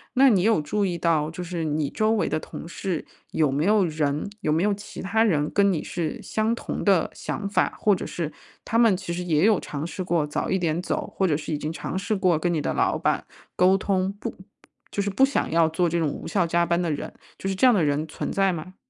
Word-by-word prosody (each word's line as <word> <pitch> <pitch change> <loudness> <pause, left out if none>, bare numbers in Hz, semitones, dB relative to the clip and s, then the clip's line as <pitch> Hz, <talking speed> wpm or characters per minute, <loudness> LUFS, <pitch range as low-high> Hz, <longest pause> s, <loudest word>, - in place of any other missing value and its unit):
那 270 +2 +6
你 205 -8 +4
有 220 -1 +3
注 205 +8 -1
意 175 -2 -1
到， 160 -2 +1
就 180 - -7
是 175 -1 -4
你 150 -2 -1
周 215 0 +1
围 225 - +1
的 155 - 0
同 160 - -8
事 175 -1 -3 0.3
有 155 -3 +2
没 140 +3 0
有 205 +1 +4
人 150 +1 -1
有 155 - 0
没 160 +2 +2
有 205 0 +2
其 205 +1 -8
他 220 +4 +2
人 155 -9 +2
跟 200 -1 +3
你 165 - -1
是 165 -3 -4
相 220 +1 0
同 235 - -4
的 190 -6 +3
想 200 - -4
法？ 200 - 0
或 205 -2 +4
者 - - -5
是 160 -3 -4 0.3
他 230 - 0
们 225 -5 +5
其 180 -2 -5
实 180 +1 -3
也 165 0 +2
有 215 -2 +5
尝 150 0 -5
试 185 - -5
过 170 -4 0
早 150 - -2
一 190 - +1
点 170 0 0
走， - - -2
或 195 - +2
者 150 -5 +2
是 155 0 -5
已 - - 0
经 150 +1 -3
尝 165 - -4
试 200 +3 -1
过 185 -5 +2
跟 175 +2 0
你 160 - 0
的 145 - -1
老 - - +1
板 - - 0 0.3
沟 185 +2 +5
通， 190 -1 0
不 - - -5 0.5
就 200 - -2
是 200 - -1
不 265 - +2
想 275 - -1
要 165 0 +4
做 170 +2 +1
这 170 +1 0
种 160 - +1
无 - - -7
效 180 -4 +1
加 170 +1 +2
班 170 +1 +1
的 170 - -1
人， 145 - -4 0.2
就 - - -5
是 - - 0
这 195 +7 +4
样 250 - +6
的 180 - +2
人 150 +1 0
存 155 - -4
在 195 -1 +2
吗？ 175 +3 -7
175 Hz, 275 characters per minute, -25 LUFS, 155-200 Hz, 0.5 s, 那